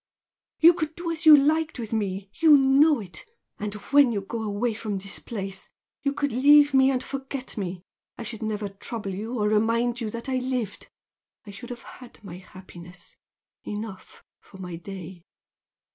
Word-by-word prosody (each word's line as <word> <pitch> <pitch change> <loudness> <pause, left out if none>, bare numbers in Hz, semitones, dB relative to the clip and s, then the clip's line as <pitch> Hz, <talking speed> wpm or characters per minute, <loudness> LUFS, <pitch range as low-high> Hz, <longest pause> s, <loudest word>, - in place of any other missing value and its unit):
You 335 +2 +8
could 315 -2 -4
do 345 -1 -4
as 325 0 -3
you 305 -1 +11
liked 310 +3 +1
with 230 -2 -6
me 195 -2 -3
you 315 -3 +6
know 275 +2 +4
it! 180 -3 -9 0.4
and 210 0 -4 0.2
when 285 -3 +6
you 205 -3 -2
go 225 +4 -5
away 220 +2 -1
from 215 -2 -4
this 200 +1 -6
place, 195 -4 -7 0.3
you 280 - 0
could 285 0 -2
leave 290 +3 +6
me 265 0 +5
and 260 -2 0
forget 270 -1 -6
me, 185 -4 -5 0.3
I - - -6
should 225 -1 -7
never 215 -1 -2
trouble 200 +1 -6
you 220 +6 -5
or 210 -1 +1
remind 230 +3 +1
you 220 - -2
that 235 +3 -7
I 260 -1 0
lived!! 250 -5 -3 0.6
I 205 - -9
should 220 +5 -10
have 240 -1 -8
had 250 -2 -13
my 180 -3 -9
happiness, 180 -1 -12 0.5
enough 210 -2 -8 0.2
for 195 - -16
my 180 -2 -7
day!" 180 0 -9
225 Hz, 175 wpm, -25 LUFS, 200-270 Hz, 0.6 s, you